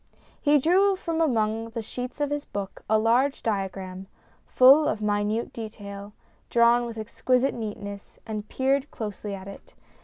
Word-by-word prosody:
He 295 0 +5
drew 375 +7 +4
from 330 -3 -2
among 225 -6 +1
the 225 0 -5
sheets 250 +5 -6
of 290 -1 0
his 290 0 -2
book 200 -1 -6
a 220 - +5
large 240 +6 +2
diagram, 190 -3 -3 0.4
full 275 +4 +7
of 215 - -1
minute 210 +2 -1
detail, 205 -2 -8 0.4
drawn 235 0 +4
with 230 -1 -7
exquisite 250 +4 0
neatness, 205 -3 -7
and 215 -1 -5
peered 270 +2 0
closely 210 -2 -5
at 190 0 -10
it. 200 - -12
225 Hz, 150 wpm, -26 LUFS, 205-260 Hz, 0.4 s, full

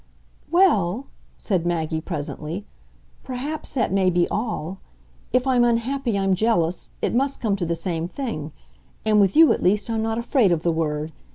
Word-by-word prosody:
"Well," 265 - +3 0.3
said 185 -6 -1
Maggie 160 -2 -1
presently, 160 +3 -5 0.6
"perhaps 280 +5 -5
that 230 -7 +1
may 190 -1 +3
be 175 -1 +2
all. 195 -5 -3 0.5
If 250 +1 +2
I'm 255 -2 +3
unhappy 240 0 0
I'm 195 -1 +2
jealous; 185 -4 +1
it - - +1
must 270 +3 +1
come 215 -4 0
to 175 -3 -2
the 170 - 0
same 165 -1 -2
thing; 180 - -5 0.5
and 215 -1 +4
with 195 -2 +2
you, 320 0 +7
at - - -4
least, 210 +5 +2
I'm 225 -1 0
not 225 0 -1
afraid 235 -3 +2
of 165 -1 0
the 170 - +2
word. 155 -1 -2
200 Hz, 170 wpm, -23 LUFS, 170-240 Hz, 0.6 s, you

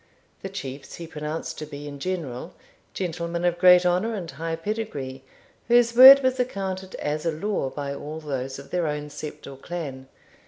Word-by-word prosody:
The 195 - -5
chiefs 140 -8 -7
he 170 - -7
pronounced 155 0 -5
to 155 - -6
be, 145 0 -8
in 140 -1 -8
general, 155 -8 -4 0.4
gentlemen 170 -1 -3
of 175 -1 +1
great 180 0 +7
honour 185 +6 +1
and 175 -5 -5
high 165 0 -3
pedigree, 165 -9 -5 0.4
whose 235 0 +4
word 265 +2 +11
was 260 0 +1
accounted 190 -6 -3
as 150 +1 -3
a 165 - +1
law 160 -2 -2
by 140 0 -4
all 150 +3 -6
those 135 -3 -4
of 140 - -12
their 175 -2 0
own 150 0 -3
sept, 150 +1 -8
or 135 -1 -9
clan. 135 -4 -6
165 Hz, 180 wpm, -25 LUFS, 145-190 Hz, 0.4 s, word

